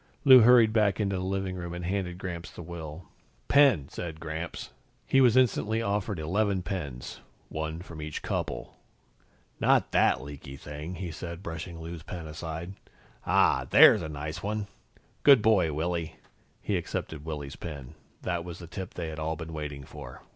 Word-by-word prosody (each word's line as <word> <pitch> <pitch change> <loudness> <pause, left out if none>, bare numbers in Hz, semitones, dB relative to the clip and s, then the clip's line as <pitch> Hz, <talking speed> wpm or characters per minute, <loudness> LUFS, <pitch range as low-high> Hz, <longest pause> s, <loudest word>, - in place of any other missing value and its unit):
Lou 130 -2 +10
hurried 115 -1 +7
back 105 -3 +3
into 100 -2 0
the 90 - -2
living 95 0 -2
room 85 -1 -5
and 90 0 -5
handed 90 -1 -2
Gramps 90 -2 -5
the - - -9
will. 80 0 -8 0.4
"Pen!" 135 - +5
said 80 -3 -6
Gramps. 80 +1 -5 0.3
He 135 - +4
was 125 -1 +5
instantly 115 -3 +3
offered 105 -2 -1
eleven 95 +4 0
pens, 75 -11 -5 0.3
one 80 +2 -4
from 80 -4 -9
each 75 -1 -5
couple. - - -3 0.8
"Not - - +3
that - - +4
leaky 70 -1 -9
thing," 75 +5 -7
he 90 -1 -5
said, 85 +3 -7
brushing 85 0 -6
Lou's 80 0 -7
pen 85 +1 -7
aside. 80 +3 -6 0.5
"Ah, - - +3
there's - - +8
a 80 - -5
nice 75 +2 -5
one. 105 +1 -2 0.6
Good 135 -6 +7
boy, 100 -8 +4
Willy." 80 +1 -2 0.5
He - - 0
accepted 75 -2 -4
Willy's 75 -3 -5
pen. 75 -4 -8 0.3
That 85 -1 -1
was 85 -1 -7
the 85 - -9
tip 95 +2 -7
they 85 -2 -3
had 80 0 -6
all 80 +1 -1
been 80 +1 -7
waiting 75 -3 -5
for. - - -10
85 Hz, 170 wpm, -28 LUFS, 80-95 Hz, 0.8 s, Lou